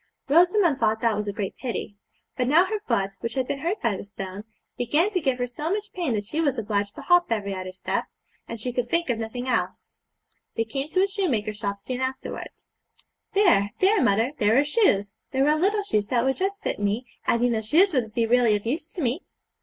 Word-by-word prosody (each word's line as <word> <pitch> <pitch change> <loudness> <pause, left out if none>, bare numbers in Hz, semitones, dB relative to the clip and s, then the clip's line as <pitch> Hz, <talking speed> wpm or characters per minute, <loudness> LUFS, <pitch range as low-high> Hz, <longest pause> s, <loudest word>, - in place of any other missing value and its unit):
Rosamond 345 0 +4
thought 220 +1 +2
that 230 -2 +2
was 210 0 -3
a - - 0
great 200 -2 -4
pity. 235 -5 -4 0.4
But 250 - 0
now 325 +7 +5
her 425 +2 -2
foot, 195 0 +1
which 230 -1 -4
had 260 -2 0
been 280 - -2
hurt 350 +8 -2
by 230 -4 +2
the - - -6
stone, 200 0 -7 0.3
began 300 - +1
to 365 -3 0
give 265 -4 +1
her 245 - 0
so 295 +6 -5
much 420 +2 -2
pain 340 -9 -1
that 205 - -1
she 310 +10 -2
was 280 -5 +1
obliged 205 -2 -1
to - - -9
hop 355 0 +4
every 205 -3 -1
other 185 -1 -5
step, 185 - -2 0.4
and 230 - -6
she 245 +3 -3
could 240 -1 -1
think 335 -3 +1
of 230 - -2
nothing 245 +3 -4
else. 255 - -2 0.6
They 225 - +1
came 270 +6 -4
to 370 +4 +2
a - - +3
shoemaker's 260 - -1
shop 200 -2 -3
soon 255 +5 -5
afterwards. 260 0 -5 0.6
'There, 280 - +4
there, 390 +1 +4
mother, 225 +6 +2
there 215 +3 +4
are 280 - +5
shoes; 250 - +2 0.2
there 270 +2 +3
are 300 - +4
little 405 +6 +1
shoes 210 - 0
that 240 0 +1
would 265 0 +1
just 395 +2 -2
fit - - -2
me, 205 +5 -1 0.2
and 235 +1 +2
you 245 - +3
know 220 -1 0
shoes 325 - +3
would 230 -5 -1
be 230 - +2
really 235 -2 +4
of 205 - -4
use 305 +7 -2
to 340 - -5
me.' 255 +8 0
250 Hz, 230 wpm, -25 LUFS, 215-330 Hz, 0.6 s, now